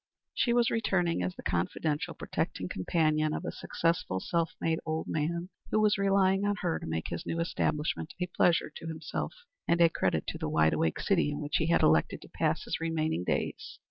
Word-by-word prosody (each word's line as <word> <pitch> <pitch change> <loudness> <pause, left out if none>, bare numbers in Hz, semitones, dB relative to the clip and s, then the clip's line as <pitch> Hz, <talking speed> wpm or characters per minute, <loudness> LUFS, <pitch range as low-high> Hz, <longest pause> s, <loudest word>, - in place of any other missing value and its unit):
She 240 - +1
was 240 -1 +3
returning 190 - +1
as 90 0 -2
the - - -10
confidential, 95 - -1
protecting 90 - -3
companion 155 - +1
of - - -4
a - - -2
successful, 165 - -1
self 165 - 0
made 165 0 0
old 160 0 -2
man, 170 +3 -2 0.2
who 215 - +2
was 210 -1 +3
relying 195 0 +3
on 205 0 +1
her 175 -4 0
to - - -7
make 80 0 -2
his 85 - -4
new 165 - -3
establishment 160 -2 -1
a 180 - +1
pleasure 175 -3 +2
to 165 - -8
himself 160 - -4 0.3
and 170 - +3
a 170 -1 +7
credit 90 - 0
to - - -5
the - - -2
wide 80 0 +3
awake 80 -1 0
city 175 -6 +2
in 145 - -3
which 145 0 -1
he 160 - 0
had 170 - +3
elected 80 0 +3
to - - -14
pass - - 0
his - - -3
remaining 160 - -1
days. - - -2
165 Hz, 205 wpm, -30 LUFS, 145-180 Hz, 0.3 s, a